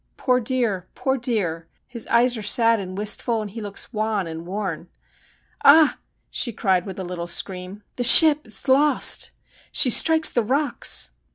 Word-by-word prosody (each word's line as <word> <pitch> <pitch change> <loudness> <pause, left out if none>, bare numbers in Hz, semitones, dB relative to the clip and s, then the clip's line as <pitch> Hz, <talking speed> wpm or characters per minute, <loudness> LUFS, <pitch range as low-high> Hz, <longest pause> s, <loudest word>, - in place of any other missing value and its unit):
Poor 250 -1 0
dear! 230 -7 -3
poor 265 -1 -2
dear! 200 -10 -3 0.2
His 235 -2 -11
eyes 245 +1 +1
are 220 - -7
sad 230 +2 +2
and 185 -1 -8
wistful, 215 +2 -1
and 210 -2 -7
he 225 +2 -9
looks 205 +4 -5
wan 215 -2 -3
and 165 +1 -9
worn. 185 -4 -6 0.7
Ah! 305 +1 +5 0.2
' - - -49
she 240 - -1
cried 190 -3 -1
with 190 - -9
a 190 - -6
little 175 -1 -7
scream, 185 +3 -5
' - - -49
the 245 - -2
ship 300 +2 +7
is 220 - -3
lost. 285 +3 +2 0.4
She 250 - +3
strikes 320 +5 +4
the 240 - 0
rocks.' 250 - -2
220 Hz, 175 wpm, -21 LUFS, 190-250 Hz, 0.7 s, ship